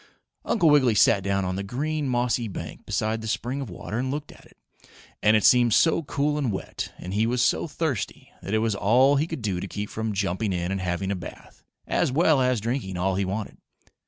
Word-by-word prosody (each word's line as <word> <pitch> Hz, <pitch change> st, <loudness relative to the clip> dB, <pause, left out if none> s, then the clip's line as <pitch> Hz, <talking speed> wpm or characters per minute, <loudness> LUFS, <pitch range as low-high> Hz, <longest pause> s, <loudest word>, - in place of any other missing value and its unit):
Uncle 185 Hz, -8 st, +2 dB
Wiggily 130 Hz, -6 st, +4 dB
sat 100 Hz, 0 st, +5 dB
down 100 Hz, 0 st, 0 dB
on 90 Hz, 0 st, -2 dB
the -, -, -2 dB
green, 145 Hz, +7 st, -2 dB
mossy 120 Hz, -1 st, 0 dB
bank 85 Hz, -6 st, -8 dB
beside 110 Hz, +1 st, -1 dB
the 110 Hz, -, -6 dB
spring 125 Hz, +4 st, -2 dB
of 130 Hz, -, -6 dB
water 105 Hz, +5 st, -5 dB
and 130 Hz, +1 st, -1 dB
looked 145 Hz, +2 st, -4 dB
at -, -, -17 dB
it. -, -, -22 dB, 0.6 s
And 110 Hz, +1 st, +5 dB
it 105 Hz, -, -1 dB
seemed 120 Hz, -3 st, +5 dB
so 165 Hz, 0 st, +4 dB
cool 150 Hz, 0 st, -1 dB
and 130 Hz, -6 st, 0 dB
wet, 95 Hz, -, -5 dB
and 90 Hz, -, -7 dB
he 110 Hz, +2 st, +2 dB
was 125 Hz, +1 st, +1 dB
so -, -, +1 dB
thirsty, 150 Hz, -, -3 dB
that 100 Hz, -, -2 dB
it 110 Hz, +1 st, +1 dB
was 110 Hz, -, +1 dB
all 125 Hz, +8 st, +4 dB
he 150 Hz, +3 st, +1 dB
could 160 Hz, -8 st, -6 dB
do 95 Hz, -4 st, -1 dB
to 100 Hz, -, -5 dB
keep 105 Hz, +2 st, -5 dB
from 110 Hz, 0 st, -3 dB
jumping 100 Hz, +1 st, -1 dB
in 90 Hz, 0 st, -2 dB
and 95 Hz, -1 st, -2 dB
having 90 Hz, +1 st, -2 dB
a -, -, 0 dB
bath, 90 Hz, -, -11 dB, 0.2 s
as -, -, +1 dB
well 155 Hz, -1 st, +3 dB
as 125 Hz, -2 st, +2 dB
drinking 110 Hz, -4 st, -3 dB
all 95 Hz, +2 st, 0 dB
he 95 Hz, +1 st, 0 dB
wanted. 100 Hz, +3 st, -4 dB
110 Hz, 225 wpm, -25 LUFS, 100-130 Hz, 0.6 s, sat